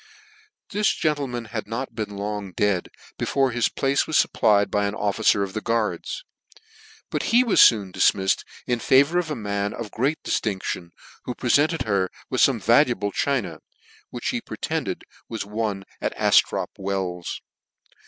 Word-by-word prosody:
This 210 +1 +2
gentleman 140 -6 -1
had 110 0 -5
not 115 +2 -4
been 105 -3 -5
long 100 -2 -4
dead 100 -3 0 0.3
before 135 -2 +1
his 120 -1 +1
place 135 +1 0
was 155 - +2
fupplied 100 -2 +3
by 100 0 +1
an 100 - -3
officer 105 -1 +2
of 95 -1 -5
the 110 - -3
guards; 115 - -2 0.9
but - - -1
he 240 +2 +5
was 235 - +4
foon 100 -5 +5
difmified 95 -1 +2 0.2
in 120 -1 0
favour 140 +9 +4
of 170 -3 -3
a 150 - -2
man 100 -2 -2
of 115 -3 -6
great 140 +7 0
diilinclion, 95 -4 -2 0.4
who 125 - -4
prefented 145 +6 +2
her 100 -4 0 0.2
with - - +1
fome - - +4
valuable 100 0 +3
china, 100 - -1 0.5
which - - -3
me - - -2
pretended - - -4 0.3
was 115 -3 -4
won 105 -2 -3 0.2
at - - -2
Aftrop - - +3
Wells. 95 -3 -3
110 Hz, 155 wpm, -24 LUFS, 100-130 Hz, 0.9 s, he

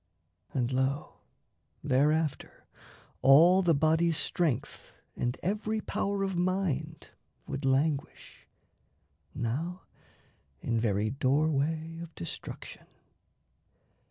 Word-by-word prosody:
And, 125 -2 -1
lo, 135 +3 -1 0.7
thereafter, 150 +2 0 0.6
all 165 +8 +7
the 170 -4 +3
body's 160 +2 +2
strength 160 -9 -2 0.2
And 125 +1 -2
every 215 +3 -1
power 200 -1 -2
of 195 -1 -2
mind 175 -4 -1 0.4
would 140 0 -4
languish, 140 +2 -1 0.9
now 160 +11 -3 0.8
In 115 - -1
very 110 -1 0
doorway 155 +4 0
of 170 -2 -10
destruction. 85 - -8
155 Hz, 85 wpm, -30 LUFS, 135-170 Hz, 0.9 s, all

